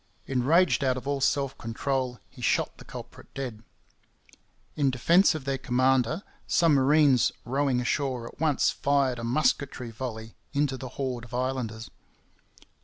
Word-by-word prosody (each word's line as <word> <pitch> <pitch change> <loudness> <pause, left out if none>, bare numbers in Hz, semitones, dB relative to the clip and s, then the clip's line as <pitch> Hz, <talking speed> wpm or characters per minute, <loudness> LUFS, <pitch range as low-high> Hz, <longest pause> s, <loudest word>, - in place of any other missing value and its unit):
Enraged 145 +6 +3
out 130 -1 +1
of 130 - -7
all 140 -1 -1
self 140 0 +1
control, 125 +1 -2
he - - -15
shot - - 0
the - - -10
culprit - - -11
dead. 125 -6 -5 1.1
In 140 -2 +2
defence 170 - +4
of 150 -4 -6
their 135 -1 -1
commander 130 - +1 0.2
some 165 -3 +3
marines 140 -1 +4
rowing 135 0 +1
ashore 125 -1 -1
at - - -14
once 155 -3 +2
fired 140 -3 +1
a - - -6
musketry 125 -1 0
volley 110 -2 -6 0.2
into 140 -2 +1
the 130 -1 -7
horde 125 -3 -3
of 120 - -8
islanders. 125 -3 -3
130 Hz, 145 wpm, -27 LUFS, 125-140 Hz, 1.1 s, defence